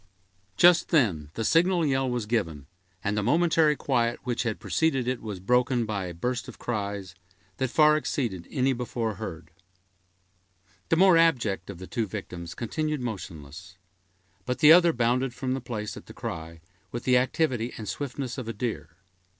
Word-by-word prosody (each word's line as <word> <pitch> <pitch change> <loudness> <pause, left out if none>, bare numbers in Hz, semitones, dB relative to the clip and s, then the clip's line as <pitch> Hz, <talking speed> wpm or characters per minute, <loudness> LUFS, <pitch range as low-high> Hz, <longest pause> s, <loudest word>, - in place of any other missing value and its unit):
Just 175 0 +6
then 95 - +2
the 115 - -2
signal 170 - +3
yell 135 -2 +1
was 120 -3 -2
given, 85 - -2 0.4
and 100 +1 0
the 105 - +1
momentary 160 +4 +3
quiet 120 -4 0
which 120 -2 -1
had 115 -3 -2
preceded 135 -6 0
it 130 -1 -1
was 105 -4 -6
broken 125 +4 +2
by 105 -3 -3
a 90 - -6
burst 125 +7 -2
of - - -10
cries, 100 -5 -4 0.4
that 130 -2 -1
far 150 +3 +5
exceeded 115 - -2
any 135 0 +1
before 120 -2 -3
heard. 85 -6 -7 1.4
The - - +4
more 185 0 +6
abject 120 - +1
of - - -7
the 95 - -8
two 110 +3 -2
victims 90 -4 -7
continued 150 +4 -2
motionless; 90 - -7 0.7
but 125 0 -2
the 150 +1 +8
other 175 -1 +6
bounded 125 0 0
from 130 0 -2
the 135 - -3
place 110 -3 -5
at - - -11
the - - -11
cry, 80 0 -6 0.3
with 120 - -5
the 125 -1 +4
activity 125 -3 0
and 110 - -7
swiftness 130 +3 -4
of 125 - -6
a 115 - -3
deer. 105 -8 -5
120 Hz, 170 wpm, -27 LUFS, 100-135 Hz, 1.4 s, the